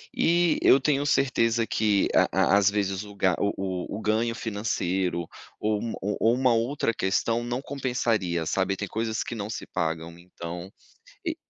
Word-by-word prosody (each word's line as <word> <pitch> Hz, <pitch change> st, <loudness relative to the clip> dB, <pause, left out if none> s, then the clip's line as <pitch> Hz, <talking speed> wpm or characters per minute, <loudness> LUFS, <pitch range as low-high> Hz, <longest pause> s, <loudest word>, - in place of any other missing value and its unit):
E 170 Hz, -1 st, +3 dB
eu 135 Hz, -, +6 dB
tenho 140 Hz, +1 st, +1 dB
certeza 115 Hz, -5 st, +2 dB
que 105 Hz, -3 st, +2 dB
a -, -, +5 dB
a 100 Hz, -, +4 dB
às 100 Hz, -1 st, +4 dB
vezes 100 Hz, -1 st, -1 dB
o 105 Hz, -1 st, -11 dB
ga 95 Hz, -2 st, +2 dB
o 100 Hz, -, +1 dB
o 95 Hz, 0 st, -3 dB
o -, -, -6 dB
ganho 115 Hz, +2 st, +1 dB
financeiro, 95 Hz, -6 st, -2 dB, 0.3 s
ou 105 Hz, -1 st, 0 dB
um 115 Hz, -, -3 dB
ou 100 Hz, +1 st, -2 dB
ou 115 Hz, +1 st, +4 dB
uma 130 Hz, -1 st, +3 dB
outra 115 Hz, +1 st, 0 dB
questão 115 Hz, +5 st, 0 dB
não 120 Hz, +2 st, -3 dB
compensaria, 115 Hz, -, -1 dB
sabe, 95 Hz, +3 st, 0 dB
tem 105 Hz, +1 st, -4 dB
coisas 110 Hz, 0 st, -2 dB
que -, -, -6 dB
não 105 Hz, -2 st, -5 dB
se -, -, -5 dB
pagam. 80 Hz, -1 st, -3 dB
Então 85 Hz, 0 st, -8 dB, 0.6 s
e 330 Hz, -1 st, -1 dB
105 Hz, 175 wpm, -26 LUFS, 95-120 Hz, 0.6 s, eu